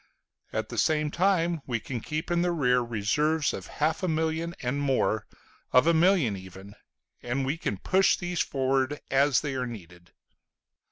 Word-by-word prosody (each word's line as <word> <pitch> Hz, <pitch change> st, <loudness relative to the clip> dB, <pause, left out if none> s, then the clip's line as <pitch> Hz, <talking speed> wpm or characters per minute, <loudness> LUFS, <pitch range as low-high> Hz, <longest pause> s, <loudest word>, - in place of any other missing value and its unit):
At 110 Hz, 0 st, -3 dB
the 120 Hz, -, -3 dB
same 150 Hz, +2 st, +1 dB
time 175 Hz, -3 st, +1 dB
we 120 Hz, -3 st, -1 dB
can 125 Hz, +3 st, -5 dB
keep 155 Hz, +7 st, -4 dB
in 170 Hz, 0 st, +2 dB
the 175 Hz, 0 st, +1 dB
rear 125 Hz, -7 st, +2 dB
reserves 125 Hz, +8 st, 0 dB
of -, -, -6 dB
half 155 Hz, +6 st, +1 dB
a 185 Hz, -, 0 dB
million 160 Hz, +1 st, -1 dB
and 130 Hz, +4 st, -1 dB
more, 130 Hz, -6 st, 0 dB, 0.4 s
of 125 Hz, -, +5 dB
a 170 Hz, -, +4 dB
million 165 Hz, -, +3 dB
even, 95 Hz, +1 st, -11 dB, 0.5 s
and 130 Hz, +3 st, -2 dB
we 140 Hz, +4 st, 0 dB
can 105 Hz, -11 st, -3 dB
push 190 Hz, -, +3 dB
these 175 Hz, -1 st, -3 dB
forward 135 Hz, +1 st, 0 dB
as 135 Hz, -1 st, +3 dB
they 145 Hz, -3 st, -3 dB
are 130 Hz, -1 st, -2 dB
needed. 90 Hz, -6 st, -11 dB
140 Hz, 170 wpm, -27 LUFS, 120-160 Hz, 0.5 s, of